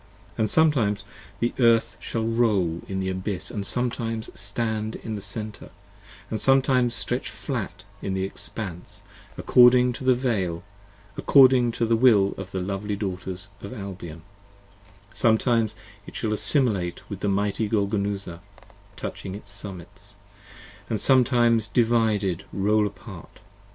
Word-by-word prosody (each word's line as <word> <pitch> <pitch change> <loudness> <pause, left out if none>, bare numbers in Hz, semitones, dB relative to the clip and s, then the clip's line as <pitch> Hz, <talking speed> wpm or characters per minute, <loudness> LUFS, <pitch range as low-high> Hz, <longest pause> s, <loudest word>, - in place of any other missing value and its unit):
40 - - -26
And 110 - +1
sometimes 120 -11 +2 0.4
the 120 - 0
Earth 115 -2 +3
shall 115 -1 -3
roll 105 -8 +1
in 95 -1 -3
the 95 0 -2
Abyss 95 0 -4
& - - -1
sometimes 115 0 -3
Stand 110 +1 -2
in 110 - -6
the 105 - -5
Center 105 +1 -6 0.4
& - - -10
sometimes 130 -2 +2
stretch 120 +1 -2
flat 100 - -5 0.2
in 95 - -3
the 95 - -1
Expanse, 95 -2 -7 0.3
According 125 0 +5
to 125 - -8
the 130 -1 +4 1.8
will 105 -6 +5
of 95 - -7
the 95 -2 -4
lovely 100 +2 -3
Daughters 95 -1 -5
of 100 - -8
Albion, 90 -7 -8 0.9
Sometimes 115 -1 +2 0.3
it - - -11
shall 110 -2 -1
assimilate 105 - +4
with 100 -2 -8
mighty 100 +1 0
Golgonooza, 100 -4 -2 0.6
Touching 95 - -6
its 100 0 -9
summits: 100 0 -8 0.4
& 115 - -8
sometimes 120 -3 +3
divided 110 -6 +1
roll 105 +2 +2
apart. 100 -3 -12
105 Hz, 120 wpm, -24 LUFS, 95-115 Hz, 1.8 s, According